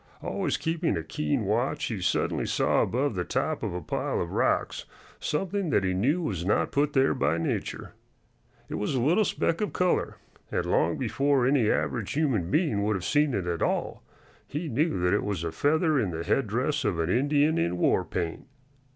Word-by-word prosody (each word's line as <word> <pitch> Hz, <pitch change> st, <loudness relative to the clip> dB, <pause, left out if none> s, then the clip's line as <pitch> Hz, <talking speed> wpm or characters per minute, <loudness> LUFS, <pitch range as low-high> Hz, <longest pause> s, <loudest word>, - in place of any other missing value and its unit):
Always -, -, -1 dB
keeping 165 Hz, -, -1 dB
a 80 Hz, -, -3 dB
keen 75 Hz, -2 st, -1 dB
watch, -, -, 0 dB
he -, -, -3 dB
suddenly -, -, 0 dB
saw -, -, +2 dB
above 135 Hz, +2 st, 0 dB
the 90 Hz, -2 st, -2 dB
top -, -, -1 dB
of -, -, -3 dB
a 90 Hz, -, -3 dB
pile -, -, -2 dB
of -, -, -3 dB
rocks -, -, 0 dB, 0.3 s
something 190 Hz, +3 st, -1 dB
that 100 Hz, -, +2 dB
he 95 Hz, -1 st, +1 dB
knew 140 Hz, -, +1 dB
was 95 Hz, -, -2 dB
not 100 Hz, -, +1 dB
put 145 Hz, +1 st, +1 dB
there 135 Hz, -1 st, +3 dB
by 75 Hz, +4 st, +1 dB
nature. 85 Hz, -, -3 dB, 0.7 s
It -, -, -4 dB
was 105 Hz, +6 st, -1 dB
a -, -, +1 dB
little 165 Hz, -, +3 dB
speck 165 Hz, -1 st, 0 dB
of 210 Hz, -, -1 dB
color, 180 Hz, 0 st, 0 dB, 0.3 s
and -, -, -1 dB
long -, -, +1 dB
before 140 Hz, -2 st, +1 dB
any 130 Hz, -5 st, +3 dB
average 110 Hz, -5 st, -1 dB
human 130 Hz, -, 0 dB
being 150 Hz, -, +1 dB
would 105 Hz, +1 st, +1 dB
have 90 Hz, -2 st, -4 dB
seen 150 Hz, -3 st, +2 dB
it 95 Hz, -3 st, -2 dB
at 85 Hz, -1 st, -2 dB
all -, -, -1 dB, 0.5 s
he 155 Hz, +4 st, -4 dB
knew 145 Hz, -, 0 dB
that 90 Hz, 0 st, +2 dB
it 105 Hz, -, +1 dB
was 100 Hz, -5 st, -2 dB
a 85 Hz, -, -2 dB
feather 155 Hz, -, +2 dB
in 105 Hz, -, 0 dB
the 85 Hz, -1 st, -4 dB
headdress 130 Hz, -, 0 dB
of 100 Hz, -7 st, 0 dB
an 85 Hz, +1 st, 0 dB
Indian 145 Hz, +5 st, +2 dB
in 85 Hz, +2 st, 0 dB
war 90 Hz, -, +2 dB
paint. 85 Hz, -2 st, -4 dB
125 Hz, 195 wpm, -27 LUFS, 90-150 Hz, 0.7 s, there